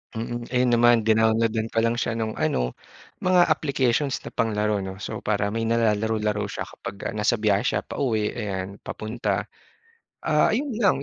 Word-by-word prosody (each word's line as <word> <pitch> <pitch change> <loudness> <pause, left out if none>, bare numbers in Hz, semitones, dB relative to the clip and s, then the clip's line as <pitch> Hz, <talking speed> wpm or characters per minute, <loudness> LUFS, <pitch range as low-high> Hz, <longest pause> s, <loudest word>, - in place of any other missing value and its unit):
Mm. 120 +1 -4
Ayun 125 0 +2
naman 120 -1 +5
dinowload-an 110 0 +2
ko 115 0 0
lang 115 0 +2
siya 115 - -1
nung 110 -1 -2
ano 60 -1 0 0.5
mga 180 -2 +4
applications 140 -2 +1
na - - -8
panglaro 105 -2 0
'no. 95 -1 -5
So 110 - -4
para 100 -1 0
may 115 +1 -1
nalalaro-laro 110 -2 +1
siya - - -4
kapagka 100 - -7
nasa 105 +3 +1
biyahe 105 -3 +2
siya - - 0
pauwi 110 -6 -1
ayan, 100 -3 -4
papunta. 110 +2 -3 0.8
Ah, - - +3
yun 280 +5 -1
lang 195 -10 +3
110 Hz, 160 wpm, -25 LUFS, 105-120 Hz, 0.8 s, naman